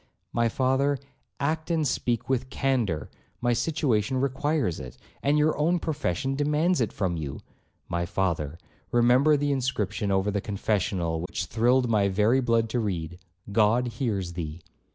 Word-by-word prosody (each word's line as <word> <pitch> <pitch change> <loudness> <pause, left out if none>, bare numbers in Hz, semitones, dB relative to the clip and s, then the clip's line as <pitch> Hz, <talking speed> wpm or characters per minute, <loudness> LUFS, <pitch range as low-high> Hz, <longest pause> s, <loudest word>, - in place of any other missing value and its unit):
'My 115 0 +2
father, 135 +2 +1 0.4
act 155 +3 -1
and 160 -3 +1
speak 120 -2 -1
with 130 0 0
candour, 125 - 0 0.3
my 120 -1 +2
situation 130 -3 +1
requires 140 - 0
it, 65 -2 -9 0.2
and 145 +2 +2
your 150 +1 +3
own 170 +4 +3
profession 135 - -1
demands 150 +3 +1
it 115 - 0
from 90 -4 -1
you. 75 -4 -5 0.5
My 85 0 -2
father, 85 -5 -1 0.3
remember 125 +5 +5
the 145 0 0
inscription 110 -6 -1
over 95 +1 +1
the 100 0 -1
confessional 95 -5 -1
which 90 +1 -3
thrilled 125 +4 +2
my 105 -3 +3
very 105 +6 +3
blood 115 -2 +2
to 120 - 0
read, 90 -5 -3 0.3
'God 115 +4 +3
hears 105 -7 -2
thee.' 85 -1 -5
120 Hz, 150 wpm, -27 LUFS, 95-135 Hz, 0.5 s, remember